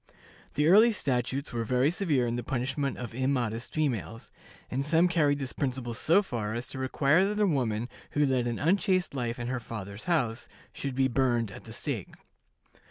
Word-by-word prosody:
The 150 +2 +3
early 215 +7 +7
statutes 135 - -1
were 115 -1 -1
very 125 +5 +2
severe 160 -9 +1
in 120 0 -1
the 120 - -2
punishment 135 +2 -2
of 120 -3 -6
immodest 120 -3 -1
females, 120 - -2 0.4
and 130 +2 0
some 165 +4 +4
carried 150 -5 +2
this 135 -2 -4
principle 130 -3 -2
so 165 - +3
far 110 - -3
as 120 +1 -4
to 135 - -5
require 140 +6 +3
that 210 +1 -1
a 210 - +4
woman 120 - 0 0.3
who 145 0 +3
led 130 -3 +1
an 120 -1 -2
unchaste 185 +2 +1
life 120 -3 -2
in 120 - -4
her 130 +1 -2
father's 105 -2 -7
house 130 -10 0 0.3
should 135 -2 -4
be 135 0 +3
burned 120 -4 +1
at - - -11
the - - -10
stake. - - -4
130 Hz, 185 wpm, -29 LUFS, 120-150 Hz, 0.4 s, early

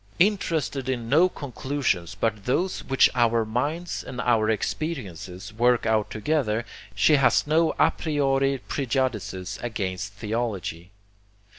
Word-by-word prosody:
Interested 165 -8 +1
in 120 -3 -2
no 165 +7 +5
conclusions 130 - -2
but 105 -3 -1
those 175 +9 0
which 135 -1 +5
our 115 -2 +2
minds 145 +10 -2
and 125 -1 -7
our 110 -3 +2
experiences 105 - -4
work 120 +2 +2
out 110 -2 +1
together, 115 -1 0 0.3
she 150 - +5
has 135 -1 +3
no 160 +2 +2
a - - +4
priori 135 -3 +1
prejudices 115 -9 -2
against 100 -4 -3
theology. 105 -6 -3
120 Hz, 120 wpm, -25 LUFS, 110-145 Hz, 0.3 s, no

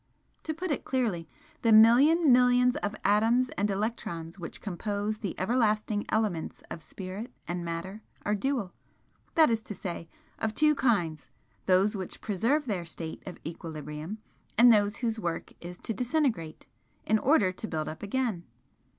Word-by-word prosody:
To 315 - -1
put 355 +1 -3
it 290 - -1
clearly, 220 -11 -1 0.3
the 230 - +3
million 265 +9 +7
millions 250 0 +5
of 205 +1 -3
atoms 225 +5 +3
and 205 +1 -1
electrons 195 -5 -3
which 170 - -7
compose 205 +2 -3
the 200 -5 -4
everlasting 215 -1 +1
elements 210 -7 -1
of 165 - -6
Spirit 195 +8 -7 0.2
and 175 +1 -3
Matter 170 +5 -5 0.2
are 210 - +1
dual 220 -3 -1 0.6
that 315 -6 +6
is 225 -1 +1
to 210 - -8
say, 170 -3 -6 0.3
of 220 -1 -2
two 305 0 +4
kinds 175 - 0 0.4
those 190 +3 +4
which 190 -3 -5
preserve 235 - 0
their 195 -7 -2
state 165 -1 -7
of 185 - -7
equilibrium, 155 +2 -6 0.4
and 240 +1 +8
those 205 -1 +2
whose 230 -2 -2
work 170 -5 -4
is 175 +1 -7
to 225 - -4
disintegrate, 245 - -1 0.4
in 220 0 +3
order 235 -9 +3
to 205 +4 -6
build 155 -4 -3
up 155 - -6
again. 210 -4 -1
210 Hz, 155 wpm, -29 LUFS, 175-240 Hz, 0.6 s, and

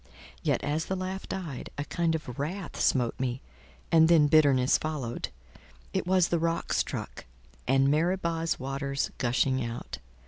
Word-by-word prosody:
Yet - - 0
as 155 +3 -1
the 190 - -1
laugh 190 +1 -5
died, 165 -9 -5
a 145 - -2
kind 165 -1 0
of 130 -6 -6
wrath 170 +5 -4
smote 125 -3 +2
me, 125 -1 -1 0.5
and 160 -1 +6
then 165 -3 +6
bitterness 140 -4 +4
followed: 145 -7 -3 0.6
it - - -1
was 185 -2 +3
the 170 - +1
rock 165 +1 -1
struck, - - -3 0.4
and 135 +1 +4
Meribah's 165 +2 +1
waters 140 +1 -2
gushing 130 +1 +1
out. 115 0 -6
150 Hz, 145 wpm, -28 LUFS, 135-170 Hz, 0.6 s, and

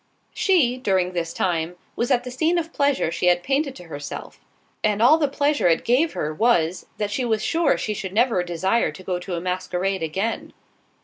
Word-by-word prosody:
She, 295 -11 +2
during 190 -7 0
this 170 -2 -2
time, 170 -1 -1 0.2
was 240 - -1
at 250 -3 +2
the 250 - -6
scene 320 +7 +1
of 335 -1 -3
pleasure 280 - +1
she 180 - -1
had 175 0 +3
painted 275 0 0
to 180 - -11
herself, 145 -4 -8 0.4
and 210 -1 +1
all 260 +8 +6
the 295 - +2
pleasure 285 -3 +1
it 165 -1 +2
gave 280 +7 +2
her 150 +1 -2
was, 175 -4 +1
that 205 -1 -2
she 255 - -1
was 220 -3 0
sure 330 -3 +2
she 215 - -2
should 190 -2 -5
never 225 -2 +2
desire 175 +3 0
to 170 +5 -12
go 180 -1 -2
to 180 0 -5
a - - -2
masquerade 185 +1 -2
again. 190 +8 -3
205 Hz, 200 wpm, -23 LUFS, 180-260 Hz, 0.4 s, all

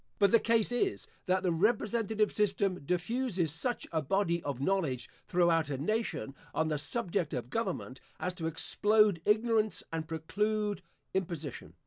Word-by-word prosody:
But 200 -1 +4
the 230 - +7
case 230 0 +2
is, 380 +11 0 0.2
that 185 0 +2
the 180 - +2
representative 215 +3 +1
system 195 -4 +1
diffuses 180 - 0
such 245 +9 -1
a 160 -2 +1
body 170 +2 +1
of 140 -5 -4
knowledge 140 -7 0 0.2
throughout 170 -3 +3
a 140 - -2
nation, 215 - -2 0.2
on 160 0 +1
the 150 -2 0
subject 170 - -1
of 125 0 -5
government, 185 - -3 0.2
as 180 - -2
to 165 -2 -3
explode 205 +3 +3
ignorance 215 -2 +2
and 160 -1 -3
preclude 205 +6 -1 0.3
imposition. 170 -7 -4
185 Hz, 145 wpm, -31 LUFS, 160-215 Hz, 0.3 s, the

